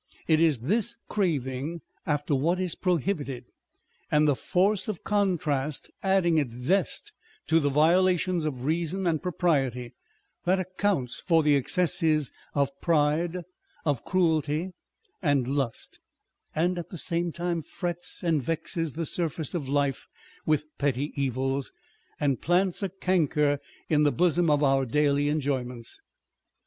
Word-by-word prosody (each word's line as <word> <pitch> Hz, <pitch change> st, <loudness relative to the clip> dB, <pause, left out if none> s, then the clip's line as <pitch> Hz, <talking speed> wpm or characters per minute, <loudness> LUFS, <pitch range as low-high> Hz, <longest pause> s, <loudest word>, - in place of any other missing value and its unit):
It 155 Hz, -1 st, +4 dB
is 155 Hz, -7 st, +3 dB
this 210 Hz, -, +1 dB
craving 155 Hz, -4 st, -1 dB, 0.3 s
after 145 Hz, -1 st, 0 dB
what 165 Hz, +7 st, +1 dB
is 180 Hz, -3 st, -1 dB
prohibited, 155 Hz, -8 st, -1 dB, 0.6 s
and 150 Hz, 0 st, +4 dB
the 145 Hz, -, +4 dB
force 190 Hz, +7 st, +1 dB
of 210 Hz, -6 st, -4 dB
contrast 155 Hz, -9 st, 0 dB
adding 190 Hz, -4 st, +3 dB
its 125 Hz, -6 st, -2 dB
zest 160 Hz, +9 st, -1 dB, 0.3 s
to 165 Hz, +1 st, +3 dB
the 145 Hz, -2 st, +1 dB
violations 175 Hz, +3 st, +3 dB
of 135 Hz, -5 st, -3 dB
reason 170 Hz, +4 st, -1 dB
and 160 Hz, -3 st, +1 dB
propriety, 135 Hz, -9 st, 0 dB, 0.5 s
that 185 Hz, +2 st, +2 dB
accounts 185 Hz, -7 st, -1 dB
for 165 Hz, -3 st, +3 dB
the 150 Hz, -1 st, +4 dB
excesses 155 Hz, 0 st, +2 dB, 0.2 s
of 140 Hz, -1 st, +2 dB
pride, 165 Hz, +2 st, +1 dB, 0.4 s
of 145 Hz, -6 st, 0 dB
cruelty, 165 Hz, -1 st, +1 dB, 0.5 s
and 145 Hz, -6 st, +2 dB
lust; 135 Hz, -4 st, -3 dB, 0.6 s
and 175 Hz, +3 st, +1 dB
at 170 Hz, -, -7 dB
the 180 Hz, -, -7 dB
same 170 Hz, +1 st, -1 dB
time 170 Hz, 0 st, -2 dB
frets 175 Hz, +2 st, -5 dB
and 165 Hz, -4 st, +2 dB
vexes 165 Hz, +2 st, -2 dB
the 165 Hz, +1 st, -3 dB
surface 160 Hz, -2 st, -1 dB
of 150 Hz, -7 st, -3 dB
life 140 Hz, -2 st, 0 dB, 0.4 s
with 155 Hz, -1 st, +2 dB
petty 140 Hz, 0 st, 0 dB
evils, 135 Hz, 0 st, -1 dB, 0.5 s
and 140 Hz, -4 st, 0 dB
plants 180 Hz, +3 st, +1 dB
a 195 Hz, -, -1 dB
canker 155 Hz, -6 st, +1 dB, 0.3 s
in 150 Hz, -2 st, +3 dB
the 145 Hz, -1 st, +4 dB
bosom 175 Hz, 0 st, +2 dB
of 150 Hz, 0 st, +3 dB
our 135 Hz, -1 st, +3 dB
daily 145 Hz, +2 st, +2 dB
enjoyments. 130 Hz, -5 st, -3 dB
155 Hz, 135 wpm, -27 LUFS, 140-175 Hz, 0.6 s, It